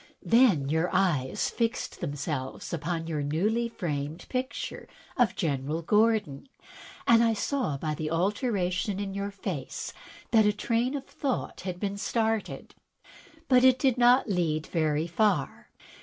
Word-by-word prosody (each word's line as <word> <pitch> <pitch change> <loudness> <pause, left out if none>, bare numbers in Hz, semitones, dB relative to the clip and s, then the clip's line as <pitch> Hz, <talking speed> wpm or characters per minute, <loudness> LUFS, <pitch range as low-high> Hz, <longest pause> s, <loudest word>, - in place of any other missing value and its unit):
Then 225 - +4
your 160 +4 +1
eyes 155 -9 +1
fixed 230 -1 -2
themselves 145 -1 -4
upon 165 +1 -2
your 155 -3 -2
newly 210 +11 0
framed 150 -5 -4
picture 260 +2 -4 0.3
of 245 -3 +2
General 150 0 -2
Gordon, 210 - +1 0.6
and 230 -1 +6
I 230 -1 +3
saw 230 - -1
by 155 +2 -2
the 155 0 -3
alteration 190 - 0
in 200 -1 -3
your 200 +1 -3
face 190 -7 -5 0.4
that 220 -3 +5
a 210 - +3
train 235 +5 0
of 275 - -8
thought 270 -3 -3
had 180 -1 -5
been 200 0 -2
started. 220 +1 -2 0.7
But 255 -1 +5
it 260 -1 +6
did 260 -2 +1
not 245 +2 +5
lead 165 -6 0
very 155 -2 0
far. 200 +5 0
195 Hz, 140 wpm, -28 LUFS, 155-230 Hz, 0.7 s, and